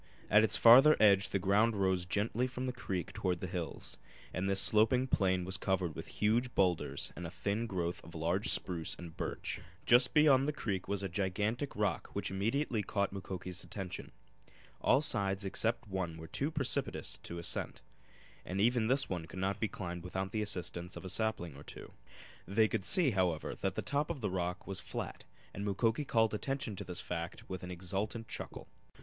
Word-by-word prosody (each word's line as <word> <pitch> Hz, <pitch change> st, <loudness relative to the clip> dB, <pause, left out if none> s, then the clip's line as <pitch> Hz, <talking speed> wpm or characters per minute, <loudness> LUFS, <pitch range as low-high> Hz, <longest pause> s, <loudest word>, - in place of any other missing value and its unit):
At 105 Hz, +1 st, +7 dB
its 110 Hz, 0 st, +3 dB
farther 130 Hz, +7 st, +8 dB
edge 100 Hz, -2 st, +5 dB
the -, -, +1 dB
ground 105 Hz, +4 st, +3 dB
rose 95 Hz, -3 st, +1 dB
gently 110 Hz, +6 st, 0 dB
from 130 Hz, 0 st, -5 dB
the 125 Hz, -, -2 dB
creek 95 Hz, -8 st, -4 dB
toward 90 Hz, -2 st, -1 dB
the -, -, -4 dB
hills, 90 Hz, -2 st, -5 dB, 0.3 s
and 95 Hz, +2 st, -1 dB
this 95 Hz, 0 st, +4 dB
sloping 110 Hz, +6 st, +4 dB
plain 95 Hz, -7 st, +1 dB
was 95 Hz, +1 st, -1 dB
covered 95 Hz, -4 st, 0 dB
with -, -, -7 dB
huge 120 Hz, +4 st, 0 dB
boulders 90 Hz, -4 st, 0 dB
and 85 Hz, 0 st, -5 dB
a -, -, -7 dB
thin 105 Hz, +6 st, -2 dB
growth 90 Hz, -4 st, -3 dB
of 85 Hz, +1 st, -12 dB
large 85 Hz, +5 st, 0 dB
spruce 85 Hz, -3 st, 0 dB
and 85 Hz, -2 st, -10 dB
birch. -, -, -4 dB, 0.2 s
Just 125 Hz, +4 st, +6 dB
beyond 140 Hz, -3 st, +6 dB
the 150 Hz, -, 0 dB
creek 100 Hz, -9 st, -3 dB
was 100 Hz, -1 st, -2 dB
a -, -, 0 dB
gigantic 105 Hz, -, -1 dB
rock 105 Hz, -6 st, 0 dB
which -, -, -2 dB
immediately 110 Hz, +4 st, 0 dB
caught 100 Hz, 0 st, -1 dB
Mukoki's 95 Hz, -1 st, -5 dB
attention. 95 Hz, -3 st, -6 dB, 0.7 s
All 135 Hz, +4 st, +4 dB
sides 100 Hz, -6 st, +2 dB
except 110 Hz, +4 st, 0 dB
one 95 Hz, -4 st, -3 dB
were 80 Hz, -, -8 dB
too 135 Hz, -, -2 dB
precipitous 150 Hz, -5 st, -1 dB
for 85 Hz, -, -6 dB
ascent, 85 Hz, -, -2 dB, 0.6 s
and 95 Hz, +2 st, -4 dB
even 115 Hz, +1 st, +3 dB
this 135 Hz, +3 st, +3 dB
one 85 Hz, -3 st, -4 dB
could 85 Hz, -, -10 dB
not 95 Hz, +2 st, -1 dB
be 110 Hz, -, +1 dB
climbed 90 Hz, -4 st, -6 dB
without 95 Hz, +1 st, -3 dB
the 110 Hz, -, -1 dB
assistance 90 Hz, -3 st, -3 dB
of -, -, -8 dB
a -, -, -4 dB
sapling 95 Hz, -7 st, -1 dB
or 70 Hz, -, -11 dB
two. -, -, -10 dB, 0.5 s
They 110 Hz, +4 st, +3 dB
could 95 Hz, -1 st, -2 dB
see, 175 Hz, -8 st, +6 dB
however, 90 Hz, -5 st, 0 dB
that -, -, -3 dB
the -, -, -2 dB
top 145 Hz, +1 st, 0 dB
of 135 Hz, -, -4 dB
the, 105 Hz, -4 st, -1 dB
rock 90 Hz, 0 st, -2 dB
was 95 Hz, -1 st, -3 dB
flat, -, -, -6 dB, 0.3 s
and 100 Hz, -, -5 dB
Mukoki 110 Hz, +7 st, +1 dB
called 110 Hz, -4 st, +2 dB
attention 135 Hz, 0 st, -2 dB
to -, -, -4 dB
this 90 Hz, -1 st, -5 dB
fact 85 Hz, +1 st, -5 dB
with 95 Hz, -1 st, -5 dB
an 90 Hz, -, -7 dB
exultant 95 Hz, +6 st, -3 dB
chuckle. -, -, -7 dB
100 Hz, 190 wpm, -33 LUFS, 90-115 Hz, 0.7 s, farther